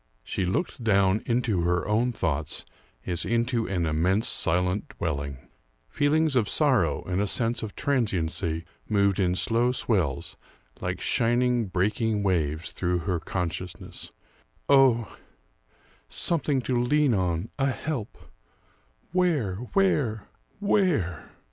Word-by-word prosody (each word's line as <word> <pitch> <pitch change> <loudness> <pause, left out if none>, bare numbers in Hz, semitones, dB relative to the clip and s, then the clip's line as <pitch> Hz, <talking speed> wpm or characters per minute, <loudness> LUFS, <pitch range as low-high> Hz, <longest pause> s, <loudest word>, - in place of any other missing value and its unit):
She 95 - -2
looked 120 - -2
down 100 -1 +3
into 115 -6 +1
her 85 +1 0
own 115 +4 +2
thoughts 80 - -2 0.4
as 90 -1 -1
into 120 0 0
an 90 -3 -1
immense, 90 +7 +1
silent 90 +4 0
dwelling. 70 -4 -4 0.4
Feelings 150 0 +2
of 115 -6 +2
sorrow 120 - +2
and 90 +2 -1
a 105 - 0
sense 115 +3 +1
of 110 -2 -6
transiency 90 - -1 0.2
moved 100 -2 +2
in 90 -2 +2
slow 115 +5 +2
swells, 95 - -1 0.4
like - - -3
shining, 120 0 +1
breaking 105 +3 0
waves, 85 -3 0
through 90 -1 -1
her 90 -3 0
consciousness. 90 +1 -5 0.6
"Oh 130 -6 +4 0.9
something 145 - +2
to 125 -1 0
lean 145 +1 +3
on 90 0 -1
a 135 - +2
help 130 -4 -4 0.9
where? 160 - +1 0.2
where? 135 - +1 0.3
where?" 170 - +1
105 Hz, 115 wpm, -26 LUFS, 90-125 Hz, 0.9 s, Oh